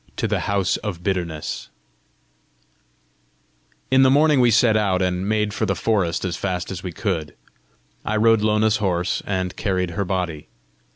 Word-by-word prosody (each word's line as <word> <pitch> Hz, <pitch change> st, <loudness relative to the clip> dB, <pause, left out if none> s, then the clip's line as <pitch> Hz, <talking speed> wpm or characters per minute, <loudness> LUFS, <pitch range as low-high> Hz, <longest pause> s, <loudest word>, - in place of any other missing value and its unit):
TO -, -, -1 dB
THE -, -, 0 dB
HOUSE 100 Hz, -2 st, +1 dB
OF 90 Hz, -5 st, -6 dB
BITTERNESS 85 Hz, -5 st, -3 dB, 2.2 s
In 130 Hz, 0 st, +5 dB
the 130 Hz, -, +6 dB
morning 150 Hz, +1 st, +4 dB
we 120 Hz, -1 st, +5 dB
set 115 Hz, 0 st, +4 dB
out, 100 Hz, -4 st, +1 dB
and 90 Hz, +1 st, -1 dB
made 105 Hz, -1 st, 0 dB
for -, -, -1 dB
the -, -, 0 dB
forest 95 Hz, -6 st, 0 dB
as 90 Hz, -2 st, -2 dB
fast 90 Hz, 0 st, -3 dB
as 90 Hz, -2 st, -5 dB
we 90 Hz, -, -5 dB
could. 80 Hz, -2 st, -3 dB, 0.7 s
I 110 Hz, -, -1 dB
rode 115 Hz, 0 st, +4 dB
Lona's 105 Hz, 0 st, +2 dB
horse, 90 Hz, -4 st, -1 dB
and 95 Hz, -2 st, -2 dB
carried 90 Hz, -4 st, -1 dB
her 100 Hz, +4 st, -2 dB
body. 90 Hz, -5 st, -3 dB
95 Hz, 160 wpm, -22 LUFS, 90-110 Hz, 2.2 s, the